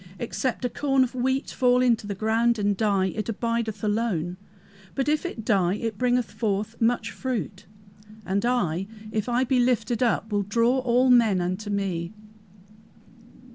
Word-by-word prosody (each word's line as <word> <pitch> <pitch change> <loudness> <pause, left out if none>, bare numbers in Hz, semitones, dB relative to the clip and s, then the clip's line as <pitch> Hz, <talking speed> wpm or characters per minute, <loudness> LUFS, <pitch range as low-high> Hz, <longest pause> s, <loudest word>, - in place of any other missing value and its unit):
Except 250 +3 -2
a - - +1
corn 270 -2 +2
of 255 - -3
wheat 260 +2 -1
fall 250 -1 +3
into 235 -4 +2
the 200 - -3
ground 225 +3 +1
and 205 -1 +1
die, 195 -3 +1
it 215 +1 -3
abideth 230 -1 -2
alone, 205 -6 -1 0.6
but 270 0 -1
if 305 +3 +1
it 225 -10 -7
die 190 -5 +2
it 220 -2 -4
bringeth 250 -1 +1
forth 210 0 -2
much 235 +2 +1
fruit, 210 -7 -4 0.6
and 195 +2 0
I, 195 -7 0 0.2
if 215 +2 -2
I 245 +2 +2
be 260 0 +1
lifted 240 -2 +1
up, 230 -2 +1
will 205 -1 +1
draw 230 +6 +2
all 250 0 +3
men 225 -6 +5
unto 185 +4 -3
me!" 190 -3 -2
225 Hz, 160 wpm, -25 LUFS, 200-245 Hz, 0.6 s, men